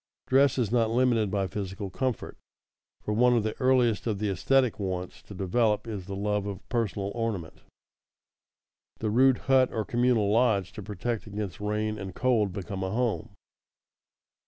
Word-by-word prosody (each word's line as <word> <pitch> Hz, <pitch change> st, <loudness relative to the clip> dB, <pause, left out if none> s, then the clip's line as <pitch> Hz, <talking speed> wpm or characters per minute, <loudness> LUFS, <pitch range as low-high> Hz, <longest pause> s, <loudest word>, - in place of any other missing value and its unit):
Dress 135 Hz, 0 st, +4 dB
is 115 Hz, -5 st, 0 dB
not 115 Hz, -2 st, +2 dB
limited 115 Hz, -3 st, +2 dB
by 100 Hz, -1 st, 0 dB
physical 95 Hz, 0 st, -5 dB
comfort, 130 Hz, +1 st, -3 dB, 0.7 s
for 105 Hz, -, -2 dB
one 125 Hz, +3 st, +4 dB
of 115 Hz, -, +1 dB
the 110 Hz, 0 st, -2 dB
earliest 125 Hz, -4 st, +3 dB
of 105 Hz, -3 st, 0 dB
the 105 Hz, +1 st, -1 dB
esthetic 125 Hz, +4 st, +2 dB
wants 90 Hz, -2 st, -4 dB
to 100 Hz, -, -12 dB
develop 105 Hz, +4 st, +1 dB
is 100 Hz, -5 st, -6 dB
the 100 Hz, -, -5 dB
love 105 Hz, 0 st, -1 dB
of 100 Hz, -1 st, -7 dB
personal 105 Hz, -4 st, -1 dB
ornament. 110 Hz, -8 st, -4 dB, 1.4 s
The 110 Hz, -1 st, -2 dB
rude 130 Hz, +2 st, +5 dB
hut 130 Hz, -1 st, +4 dB
or 110 Hz, -2 st, -2 dB
communal 120 Hz, -4 st, +2 dB
lodge 105 Hz, -5 st, +2 dB
to -, -, -7 dB
protect 105 Hz, +3 st, -4 dB
against 105 Hz, -3 st, -5 dB
rain 105 Hz, +1 st, -1 dB
and 95 Hz, -2 st, -7 dB
cold 115 Hz, -6 st, +2 dB
becomes 95 Hz, 0 st, -4 dB
a -, -, -2 dB
home. 115 Hz, +2 st, -1 dB
105 Hz, 160 wpm, -28 LUFS, 100-120 Hz, 1.4 s, rude